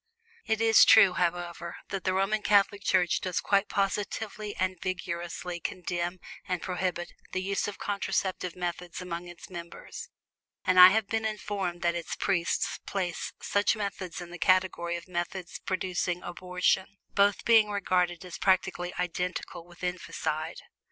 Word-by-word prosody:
It 220 0 +1
is 225 -1 +7
true, 190 -2 +8
however, 175 -1 -2
that 195 -1 -4
the 185 - +2
Roman 195 +3 +1
Catholic 205 -1 +3
Church 180 -2 +2
does 185 -2 -1
quite 200 0 +2
positively, 205 +1 -2
and 185 -1 -1
vigorously, 175 -1 -4
condemn 175 0 -3 0.3
and 180 -1 -1
prohibit 180 -1 -2 0.2
the 185 - 0
use 200 +1 -1
of 205 - -5
contraceptive 190 -3 -2
methods 175 -1 -4
among 175 -1 -5
its 175 +1 -12
members; 170 -1 -8 0.6
and 185 0 +4
I 180 - +13
have 215 +3 +3
been 225 +2 -1
informed 200 -5 -3
that 170 0 +3
its 170 -1 -4
priests 180 -4 0
place 180 -3 -2
such 205 +2 +2
methods 200 -4 -4
in 175 0 -9
the 175 - -8
category 185 -2 +2
of 170 - -7
methods 175 0 -4
producing 180 -1 -1
abortion, 180 +2 0 0.2
both 200 0 +3
being 220 -2 +6
regarded 180 -3 0
as 180 - -8
practically 185 -2 +1
identical 180 -1 -3
with 175 0 -16
infanticide. 165 -3 -3
185 Hz, 145 wpm, -29 LUFS, 175-195 Hz, 0.6 s, I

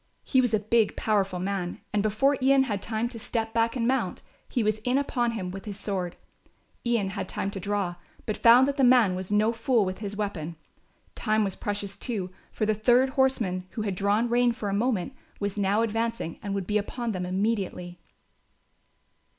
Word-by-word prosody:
He 260 - +3
was 245 -3 +1
a 215 - +3
big 220 +1 +2
powerful 195 -4 0
man 185 -1 -3
and 210 - +2
before 215 +7 +2
Ian 270 +1 +5
had 205 -7 -2
time 225 +1 -1
to 235 -2 -8
step 225 0 -3
back 230 +1 +1
and 235 -2 0
mount, 265 +1 0 0.3
he 245 - 0
was 215 0 +1
in 250 +4 +1
upon 240 -4 0
him 185 -5 -4
with 195 +2 -8
his 205 -2 -6
sword. 185 -4 -3 0.7
Ian 235 -5 +1
had 200 - -4
time 195 - -3
to 195 - -5
draw, 195 -2 -2 0.3
but 215 - -1
found 240 +3 +7
that 280 +1 -2
the 270 - +3
man 245 -6 +6
was 185 +1 -5
no 215 +2 +3
fool 235 -2 +2
with 185 0 -4
his 205 -1 -5
weapon. 175 -6 -3 0.6
Time 215 -1 +1
was 195 -2 -2
precious, 205 -1 -4
too, 195 -7 -3 0.2
for 215 - -1
the 215 - +2
third 245 +5 +4
horseman, 230 -9 +1
who 215 - -3
had 200 -2 -1
drawn 205 +5 +1
rein 240 +1 +3
for 215 -3 -4
a - - -1
moment, 225 +1 0 0.3
was 200 -1 -2
now 205 +2 +2
advancing 225 -5 -2
and 200 -1 -3
would 195 -2 -2
be 210 +2 +1
upon 235 +3 -3
them 185 -3 -3
immediately. 185 -2 -2
215 Hz, 200 wpm, -27 LUFS, 195-235 Hz, 0.7 s, found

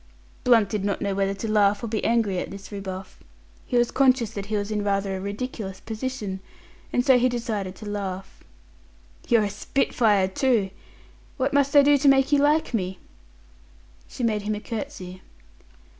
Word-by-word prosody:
Blunt 230 -4 +5
did 205 0 -3
not 200 -1 -1
know 200 -1 -1
whether 195 0 0
to 210 +3 -5
laugh 210 0 +3
or - - -2
be 215 -1 -2
angry 220 -5 +1
at - - -4
this 195 +1 -10
rebuff. 195 -1 -7 0.5
He 245 - +1
was 240 0 +2
conscious 255 -4 +3
that 200 -2 -6
he 215 0 -1
was 205 +1 -3
in 210 -1 -1
rather 195 -1 0
a 190 - -5
ridiculous 200 -1 -5
position, 220 -4 -4 0.5
and 245 - +1
so 260 -2 +6
decided 215 -6 -3
to 215 - -11
laugh. 195 -2 -5 0.8
"You're 230 -3 +4
a 205 - -1
spitfire, 210 -3 +1
too. 210 -1 +1 0.7
What 270 +1 0
must 280 0 +2
I 285 - +9
do 285 0 +5
to 280 - +2
make 270 0 +5
you 290 - +5
like 295 0 +2
me?" 190 -4 -2 1.1
She 250 - -6
made 215 -3 +1
him 210 +1 -2
a - - -5
curtsy. 210 -6 -6
210 Hz, 175 wpm, -25 LUFS, 195-250 Hz, 1.1 s, I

